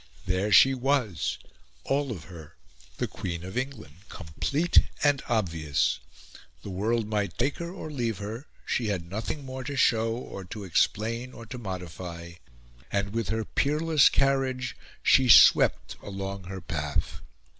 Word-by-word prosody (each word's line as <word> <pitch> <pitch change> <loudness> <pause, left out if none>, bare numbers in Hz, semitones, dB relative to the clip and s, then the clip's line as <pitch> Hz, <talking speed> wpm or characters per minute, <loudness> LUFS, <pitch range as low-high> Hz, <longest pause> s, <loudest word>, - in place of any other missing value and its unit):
There 95 +3 0
she 135 +7 +7
was, 125 - 0 0.5
all 140 -1 0
of 90 -9 -6
her 80 -3 -12 0.4
the - - 0
Queen 85 -2 -5
of 95 +2 -8
England, 125 - -5
complete 140 - +1 0.2
and 145 -2 +3
obvious; 80 - 0 0.6
the 100 - -6
world 110 +4 0
might 105 -4 -2
take 140 +4 0
her 170 0 -4
or 170 -4 -7
leave 120 -7 -2
her; 110 +7 -6 0.2
she 120 - -1
had 90 -5 -2
nothing 115 - -4
more 130 0 -6
to 140 +3 -4
show, 115 -3 +2
or 110 -5 -7
to 105 +3 -7
explain, 115 +7 0
or 115 - -10
to 125 +2 -7
modify; 90 -4 -7 0.6
and, 100 0 -1
with 115 -3 -2
her 110 0 -1
peerless 150 0 +3
carriage, 135 -2 0 0.3
she 130 -2 +5
swept - - +6
along 100 -1 -6
her 95 +1 -7
path. 75 -4 -3
110 Hz, 145 wpm, -27 LUFS, 95-130 Hz, 0.6 s, she